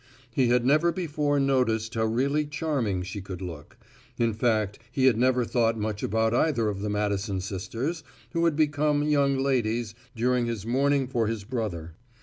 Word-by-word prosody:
He 130 -1 +3
had 120 0 +2
never 155 +6 +4
before 150 -5 0
noticed 125 -5 +1
how 110 -1 0
really 140 +7 +1
charming 140 - -1
she 95 +3 -6
could 95 -2 -7
look; 85 -6 -8 0.4
in 115 -1 +1
fact 110 -3 0
he 130 0 +1
had 130 -4 +5
never 125 +1 +2
thought 115 -1 +1
much 105 -1 -3
about 110 +2 +1
either 120 -4 +2
of 100 -2 -4
the 105 - -2
Madison 100 -1 -1
sisters, 115 - -4 0.3
who 170 0 +1
had 165 -3 +2
become 150 -1 +2
"young 140 -2 +2
ladies" 120 -5 0 0.2
during 120 +1 +1
his 115 -3 -4
mourning 135 +3 +2
for 120 -3 0
his 110 -2 -3
brother. 100 -8 -4
120 Hz, 170 wpm, -27 LUFS, 105-140 Hz, 0.4 s, had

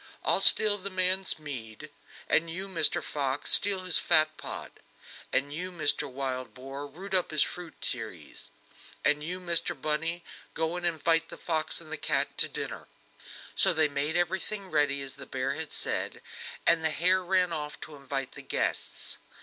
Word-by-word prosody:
I'll - - +4
steal 210 -1 +7
the 195 +1 -5
man's 185 0 +1
mead; 120 -8 -8 0.4
and 165 +1 +2
you, 185 +4 -4
Mr 185 -4 +3
Wolf, 140 -1 -1
steal 195 -2 +4
his 185 -2 +5
fat 155 -2 +3
pot; - - -8 0.5
and 140 +1 0
you, 180 +4 -4
Mr 155 -5 0
Wildboar, 130 +1 -5
root 190 +7 -9
up 185 -2 +2
his 155 -2 +4
fruit 175 -3 -7
trees; - - -4 0.6
and 150 0 +3
you, 180 +4 -3
Mr 170 -3 +1
Bunny, 165 +4 -1 0.3
go 160 +1 -1
and 175 0 -1
invite 165 0 +1
the - - -9
fox 160 -2 -1
and 155 -2 -13
the 160 - -3
cat - - -1
to - - +5
dinner." - - -5 0.7
So 190 - +5
they 155 -1 +3
made 145 +4 -1
everything 190 +3 -1
ready 145 -2 +2
as 135 - -6
the - - -10
bear 130 0 -2
had 160 -1 -5
said, - - -1 0.4
and 165 -1 +4
the 160 - +3
hare 185 +4 +2
ran 180 -1 +2
off 150 -2 -4
to 155 - -9
invite 135 -1 -4
the - - -10
guests. - - -2
160 Hz, 170 wpm, -29 LUFS, 145-180 Hz, 0.7 s, steal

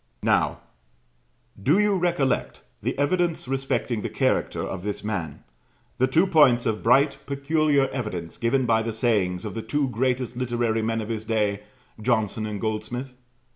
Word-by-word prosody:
Now, - - +2 1.0
do 145 - +3
you 210 -1 +3
recollect 175 -7 0 0.2
the - - -2
evidence 170 +2 0
respecting 135 -3 -1
the - - -3
character - - 0
of 95 - -4
this 105 +2 -4
man, 90 -9 -4 0.6
the 130 - +4
two 160 +8 +3
points 145 -10 +5
of 110 -1 -1
bright 135 +5 +3
peculiar 140 0 +2
evidence 100 -11 -5
given 125 +3 +1
by 115 -1 +3
the 115 0 -3
sayings 100 -6 0
of - - -4
the 115 - -4
two 145 +2 -1
greatest 125 0 -1
literary 120 -2 0
men 115 0 -1
of 110 - -6
his 110 -1 -3
day, 105 -2 0 0.4
Johnson 110 0 0
and 105 -1 -4
Goldsmith? 120 +4 -3
120 Hz, 155 wpm, -25 LUFS, 110-140 Hz, 1.0 s, points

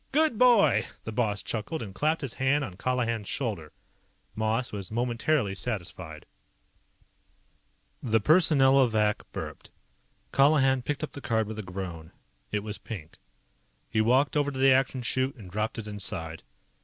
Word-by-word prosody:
"Good 300 -5 +2
boy!" 230 - +5 0.2
The 110 - -5
boss 105 -3 -1
chuckled 115 +6 -3
and 100 -3 -8
clapped 155 +8 0
his 135 -5 -3
hand 135 +2 +1
on 100 -9 -6
Colihan's 115 -1 -1
shoulder. 100 - -3 0.6
Moss 110 +3 0
was 100 -2 -5
momentarily 120 0 0
satisfied. 90 -7 -5 1.8
The 115 -2 +2
Personnelovac 135 - +4
burped. - - -7 0.6
Colihan 135 -2 +4
picked 150 +3 -3
up 155 - -4
the 145 - -8
card 110 -3 0
with 110 +1 -6
a - - -1
groan. 90 -4 -7 0.4
It 105 -1 -1
was 105 0 -5
pink. 90 -5 -9 0.7
He 110 - +2
walked 130 +7 +3
over 145 -1 +2
to 135 - -6
the 135 0 +6
Action 130 -1 +1
Chute 130 +3 -1
and 100 -8 -12
dropped 110 +3 -2
it 115 - -5
inside. 90 -6 -4
115 Hz, 145 wpm, -28 LUFS, 105-135 Hz, 1.8 s, the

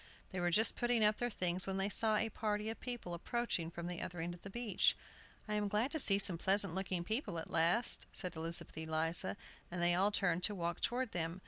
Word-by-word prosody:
They 185 - -4
were 175 0 +1
just 215 +6 +5
putting 240 -3 +2
up 210 0 +3
their 240 - -1
things 185 -3 +2
when 190 0 -2
they 195 +1 0
saw 215 +1 +2
a 225 +1 +1
party 210 0 -2
of 225 - -9
people 240 -8 -4
approaching 180 -2 -2
from 170 0 -7
the 175 0 -4
other 180 -1 -6
end 170 +2 -3
of 175 - -13
the 195 - -8
beach. 220 -2 +1 0.5
"I 210 - -3
am 210 -1 0
glad 210 +6 0
to 315 - -1
see 200 -7 +5
some 190 -4 +1
pleasant 195 -1 +2
looking 185 -2 -2
people 215 - -3
at 165 - -6
last," 170 +9 +3
said 180 -3 -2
Elizabeth 165 +1 -6
Eliza, 160 +4 -1 0.3
and 175 - -5
they 175 0 +3
all 190 +3 +3
turned 180 -4 0
to 210 - 0
walk 170 -1 -3
toward 250 -1 -1
them. 165 +1 -3
195 Hz, 230 wpm, -35 LUFS, 175-215 Hz, 0.5 s, just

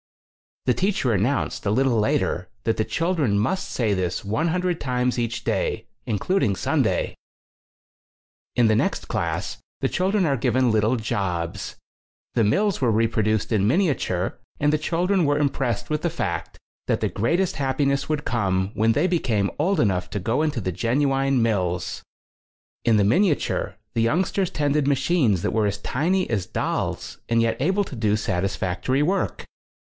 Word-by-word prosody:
The - - +3
teacher 185 - +1
announced, 115 +8 0
a 100 - 0
little 125 +1 +2
later, 90 -3 0
that 115 - 0
the 110 - +2
children 160 - 0
must 185 - 0
say 110 -4 0
this 90 -1 -2
100 170 - 0
times 125 -2 0
each 120 0 -2
day, - - -1 0.2
including 110 - +1
Sunday. - - 0 1.4
In 120 - +4
the 110 -1 +4
next - - 0
class, - - -2 0.2
the - - +1
children 190 +1 +1
are 140 -3 +1
given 125 +1 +2
little 110 +3 +2
jobs. 95 -7 -3 0.6
The 115 - +2
mills 195 - +1
were 120 -3 +3
repro 110 0 +1
duced 110 +1 0
in 105 -2 +2
miniature 125 - 0 0.2
and 145 +1 +2
the 155 - +2
children 175 +4 +1
were 145 -1 +2
impressed 130 -5 -1
with 150 0 0
the 170 - 0
fact 85 - -3 0.3
that - - +1
the - - +2
greatest 170 - 0
happiness 140 0 0
would 150 -1 -1
come 95 -4 0
when 110 +1 +2
they 150 +7 +2
became 120 - +1
old 180 +3 +2
enough 95 -7 +1
to 105 - -3
go 115 +9 0
into 150 -5 0
the 95 -3 -2
genuine 135 - +1
mills. 90 -6 -1 0.8
In 115 -2 +4
the 105 - +4
miniature 160 - +1 0.2
the 115 - +1
youngsters 180 - +1
tended 145 -1 0
machines 135 - +2
that - - 0
were 110 -2 +2
as 100 0 -2
tiny 180 - 0
as 100 -6 -1
dolls - - -3
and 115 0 +3
yet 115 0 +2
able 190 +7 +2
to 145 - -8
do 105 -2 +1
satisfactory 100 +5 -1
work. 190 +6 -1
125 Hz, 160 wpm, -24 LUFS, 105-155 Hz, 1.4 s, In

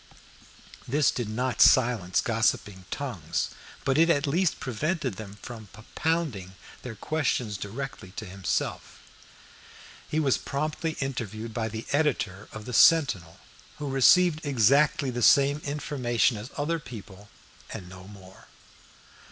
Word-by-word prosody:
This 145 +4 +3
did 120 -5 -4
not 125 +3 -1
silence 115 -8 +4
gossiping 105 -4 0
tongues, - - -3 0.3
but 135 +2 +2
it 165 +1 +5
at 145 -3 +2
least 165 +5 +1
prevented 130 - -2
them 105 -2 -9
from 115 -3 -9
propounding 110 - -3 0.3
their 120 -3 -7
questions 125 -7 -1
directly 105 +1 -6
to 110 -1 -5
himself. 95 -1 -3 1.1
He 155 - 0
was 140 -4 +2
promptly 155 +3 -3
interviewed 115 -4 -4
by 110 0 -2
the 110 0 -6
editor 110 -10 0
of 110 -1 -9
the 125 - -6
Sentinel, 115 - +4 0.4
who 145 -2 -4
received 155 +5 +5
exactly 140 +1 +3
the 120 0 -4
same 140 +4 +5
information 135 -4 0
as 105 +4 -7
other 160 +3 -1
people, 105 -6 -11 0.4
and 90 - -7
no 95 +1 -12
more. 95 -2 -15
120 Hz, 125 wpm, -27 LUFS, 105-145 Hz, 1.1 s, it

